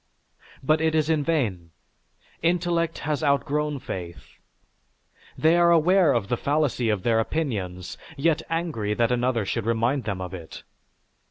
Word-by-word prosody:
But 155 +3 +2
it 160 0 +1
is 155 0 +2
in 155 -2 +1
vain; 110 - -1 0.7
intellect 170 -1 0
has 155 0 -1
outgrown 145 +1 +1
faith. 90 -10 -8 1.0
They 160 +2 +4
are 170 0 +5
aware 170 0 +4
of 115 -6 0
the 120 - -1
fallacy 140 -5 0
of 105 -4 -1
their 115 -1 +2
opinions, 105 - -3 0.2
yet 160 +2 +2
angry 160 -11 -2
that 115 +1 +1
another 125 -3 +1
should 115 +2 -2
remind 115 +4 +1
them 100 -3 -3
of 90 0 -6
it. 85 -4 -9
140 Hz, 145 wpm, -25 LUFS, 110-160 Hz, 1.0 s, are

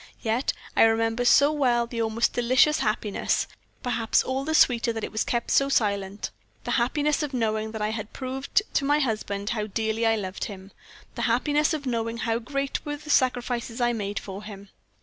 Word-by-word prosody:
Yet 230 +3 +1 0.2
I - - +4
remember 225 +1 +3
so 280 +4 +6
well 250 -5 +2
the 235 -1 -4
almost 225 +1 +1
delicious 255 +5 +3
happiness 215 -2 0 0.4
perhaps 235 -3 +1
all 265 +1 -2
the 315 +2 -1
sweeter 240 -4 +4
that 225 -1 -5
it - - -4
was 220 - 0
kept 235 -1 -2
so 275 0 +4
silent 200 -5 0 0.3
the - - -3
happiness 290 +5 +1
of 290 -3 -3
knowing 220 -2 -1
that 220 -1 -3
I 210 - +1
had 215 -1 -5
proved 265 +8 -1
to - - +2
my 290 +2 +3
husband 215 -6 -2
how 215 -2 -2
dearly 220 +2 0
I 225 - +3
loved 190 -3 -4
him; 195 -1 -9 0.4
the - - -5
happiness 295 +6 +2
of 290 -2 -6
knowing 230 -2 -2
how 230 -1 -1
great 275 +3 -3
were 295 0 -4
the 300 0 -6
sacrifices 245 -3 +1
I 240 -1 +2
made 205 -2 -3
for 195 0 -6
him. 200 -2 -10
235 Hz, 190 wpm, -26 LUFS, 220-265 Hz, 0.4 s, so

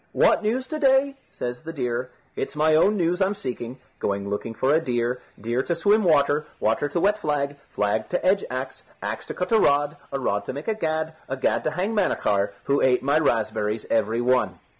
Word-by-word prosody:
"What - - +4
news 235 +5 0
to 310 +3 -4
day?" 275 0 +3 0.2
says 125 0 -5
the 160 +1 -6
deer. 125 -4 -2 0.3
"It's 135 - -4
my 155 +1 +3
own 200 +7 +4
news 175 +1 +1
I'm 195 +2 +2
seeking. 125 -6 -5 0.2
Going 100 0 -2
looking 105 +3 -4
for 135 +5 +2
a 160 - +5
deer, 120 -2 -1 0.2
deer 120 +4 -1
to 170 - -1
swim 205 +5 +3
water, 150 -2 +3
water 115 +7 +1
to 170 - -1
wet 205 +4 +2
flag, 145 -5 -1
flag 105 +1 -1
to 180 - -1
edge 190 +1 +3
axe, 130 +1 -5 0.2
axe - - -4
to - - -5
cut 180 +3 -3
a 225 - +5
rod, 145 -2 +2
a 140 - -1
rod 100 -5 -1
to - - -4
make 145 +3 -7
a 220 - +2
gad, 160 -5 -2 0.2
a 135 - -2
gad 130 - +1
to - - +3
hang 190 +7 -2
Manachar, 100 - +1
who 140 0 +1
ate 125 -1 +3
my 145 +3 +3
raspberries 110 -5 0
every 115 +1 +1
one." 125 +1 +2
145 Hz, 210 wpm, -24 LUFS, 120-180 Hz, 0.3 s, a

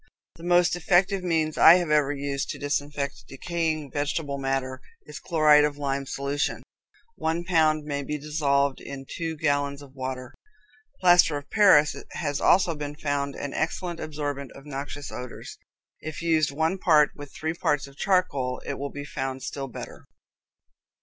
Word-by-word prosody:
The 165 - -13
most 175 0 +3
effective 180 +2 +2
means 160 -3 0
I 165 - +10
have 175 -4 0
ever 150 -2 +3
used 140 -1 -3
to - - -4
disinfect 145 -1 -3
decaying 155 0 -2
vegetable 145 -1 -2
matter 135 -1 -2 0.2
is - - -9
chloride 155 -3 +5
of 150 -1 0
lime 140 -1 -1
in - - -9
solution. 140 +2 -2 0.5
One 165 +2 -1
pound 160 -3 +2
may 145 -1 -2
be 150 +2 -3
dissolved 140 -2 0
in 135 -1 -8
two 165 -1 -4
gallons 145 -2 0
of 135 -2 -15
water. 130 -1 -5 0.7
Plaster 175 -4 +5
of 145 0 -10
Paris 195 -9 +5 0.2
has 145 -3 -2
also 180 -2 +4
been 145 -1 -6
found 145 -2 -2
an 145 - -5
excellent 170 +1 -2
absorbent 145 -3 -4
of 140 - -13
noxious 145 0 -6
odors. 125 -1 -8 0.4
If 155 +2 -7
used 160 -3 +3
one 160 +6 -1
part 150 -5 +4
with 145 -1 -10
three 160 +1 -3
parts 150 -3 0
of 140 0 -15
charcoal, 145 -9 0
it - - -4
will 140 +1 -3
be 145 +1 -7
found 135 -2 -4
still 135 -1 -4
better. 125 - -9
145 Hz, 165 wpm, -26 LUFS, 140-160 Hz, 0.7 s, I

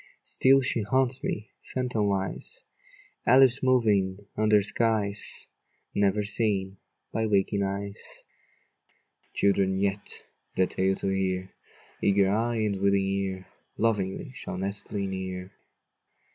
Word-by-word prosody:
Still 135 +1 +5
she 125 -3 0
haunts 130 +4 +1
me, 110 +4 -3
phantomwise, 105 -7 -2 0.6
Alice 130 +1 +6
moving 105 -6 +2
under 105 -1 +4
skies 105 -2 +1 0.5
Never 100 +1 +2
seen 100 -3 0 0.4
by 110 0 0
waking 100 0 +1
eyes. 100 +1 -4 1.1
Children 95 -1 +2
yet, 100 +1 -2 0.3
the 95 - +3
tale 95 +1 0
to 95 - -2
hear, 95 -1 -1 0.5
Eager 100 -1 +3
eye 115 +1 0
and 100 -2 0
willing 100 0 +3
ear, 95 -1 -2 0.3
Lovingly 105 +3 0
shall 90 - -6
nestle 100 +1 -3
near. 95 -1 -5
100 Hz, 105 wpm, -27 LUFS, 95-110 Hz, 1.1 s, Alice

